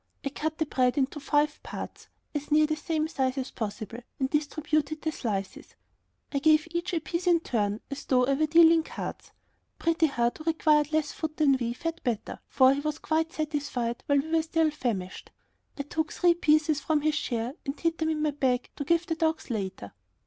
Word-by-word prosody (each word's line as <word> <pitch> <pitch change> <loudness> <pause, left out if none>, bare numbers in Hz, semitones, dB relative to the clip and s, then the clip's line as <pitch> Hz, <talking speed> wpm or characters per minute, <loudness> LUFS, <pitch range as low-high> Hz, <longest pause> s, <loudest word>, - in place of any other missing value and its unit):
I - - +1
cut 315 +2 -3
the 315 - 0
bread 255 -2 +1
into 280 +2 0
five 295 +1 +1
parts, - - -8 0.3
as 295 -1 -4
near 305 +1 +6
the 310 0 -1
same 310 0 -1
size 265 -4 -1
as 265 0 -3
possible, 220 +1 -5 0.2
and 265 0 0
distributed 305 0 -1
the 315 - 0
slices. 200 -9 -4 0.6
I 280 - 0
gave 310 +2 +4
each 345 +1 -2
a - - +2
piece 340 +3 -3
in 345 -1 +5
turn, 210 -6 -1
as 280 - -6
though 250 -1 +3
I 275 - +2
were 310 +3 +1
dealing 330 +1 +6
cards. - - -7 0.5
Pretty 330 -1 +2
Heart, 240 -2 0
who 310 - -9
required 305 -2 +3
less 310 -2 +1
food 310 -1 -5
than 285 -3 +4
we, 235 -1 -1
fared 330 +6 -4
better, 235 -5 -3
for 260 0 +5
he 275 - -2
was 305 +1 -2
quite 320 +1 0
satisfied 290 -7 -2
while 285 - +4
we 300 +3 -1
were 325 0 +4
still 320 0 +1
famished. 210 -10 -4 0.5
I 280 - -2
took 315 +3 -2
three 350 -1 +4
pieces 310 -2 +2
from 305 0 +1
his 310 +1 +2
share 240 -4 -2
and 275 +1 -5
hid 330 -1 0
them 320 0 +1
in 310 -1 -1
my 305 - +2
bag 260 -3 0
to 285 - -2
give 335 +3 +2
the 330 - -1
dogs 320 -4 -1
later. 190 - -4
300 Hz, 205 wpm, -28 LUFS, 265-315 Hz, 0.6 s, near